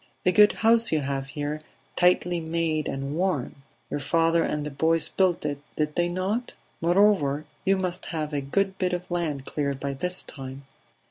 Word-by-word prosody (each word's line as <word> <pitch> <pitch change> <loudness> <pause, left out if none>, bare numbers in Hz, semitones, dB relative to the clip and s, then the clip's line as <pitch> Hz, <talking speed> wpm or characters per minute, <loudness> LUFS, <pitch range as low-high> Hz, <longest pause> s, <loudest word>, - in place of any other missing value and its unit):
"A 180 - +5
good 210 +2 +6
house 230 0 +5
you 155 -2 +2
have 135 0 -3
here; 150 +1 -4 0.3
tightly 180 -1 +3
made 160 -2 -1
and 135 +2 -3
warm. 165 -7 -1 0.3
Your - - -1
father 165 +4 +2
and 150 -2 -1
the 150 - -4
boys 160 +3 +2
built 185 -3 +1
it, 145 -1 -2 0.2
did 150 0 0
they 175 +1 +1
not? 195 +7 -2 0.3
Moreover, 170 -5 +3 0.2
you 195 0 +3
must 185 -1 -3
have 155 -2 -3
a 145 - 0
good 190 +7 -1
bit 180 -1 0
of 180 +1 -4
land 155 -6 -2
cleared 140 -2 -2
by 140 0 -3
this 180 +6 -2
time 135 0 -9
165 Hz, 180 wpm, -26 LUFS, 145-180 Hz, 0.3 s, good